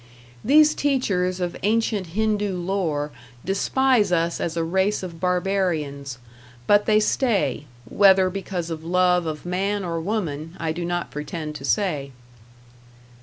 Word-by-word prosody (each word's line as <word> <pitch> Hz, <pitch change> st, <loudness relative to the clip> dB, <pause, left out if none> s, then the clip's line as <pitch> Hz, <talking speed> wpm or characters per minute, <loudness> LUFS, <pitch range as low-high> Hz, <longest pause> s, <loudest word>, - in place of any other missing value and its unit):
These 300 Hz, +4 st, +5 dB
teachers 195 Hz, -10 st, 0 dB
of 175 Hz, -1 st, -2 dB
ancient 210 Hz, -4 st, 0 dB
Hindoo 210 Hz, -3 st, 0 dB
lore 175 Hz, -5 st, -2 dB, 0.3 s
despise 215 Hz, +2 st, +2 dB
us 170 Hz, -1 st, 0 dB
as 170 Hz, 0 st, -2 dB
a 165 Hz, -, +1 dB
race 190 Hz, +5 st, 0 dB
of 170 Hz, -3 st, -7 dB
barbarians; 175 Hz, -8 st, -1 dB, 0.5 s
but 205 Hz, +5 st, +4 dB
they 215 Hz, -1 st, +5 dB
stay 215 Hz, -, 0 dB, 0.2 s
whether 190 Hz, -, +5 dB
because 180 Hz, -3 st, -4 dB
of 160 Hz, -1 st, -5 dB
love 180 Hz, 0 st, +2 dB
of 155 Hz, 0 st, -5 dB
man 195 Hz, +2 st, -1 dB
or 165 Hz, -1 st, -2 dB
woman, 165 Hz, -5 st, -3 dB
I 165 Hz, -1 st, -1 dB
do 175 Hz, +2 st, -4 dB
not 175 Hz, 0 st, -3 dB
pretend 150 Hz, +1 st, -5 dB
to 135 Hz, -, -8 dB
say. 150 Hz, -6 st, 0 dB
180 Hz, 135 wpm, -23 LUFS, 165-205 Hz, 0.5 s, These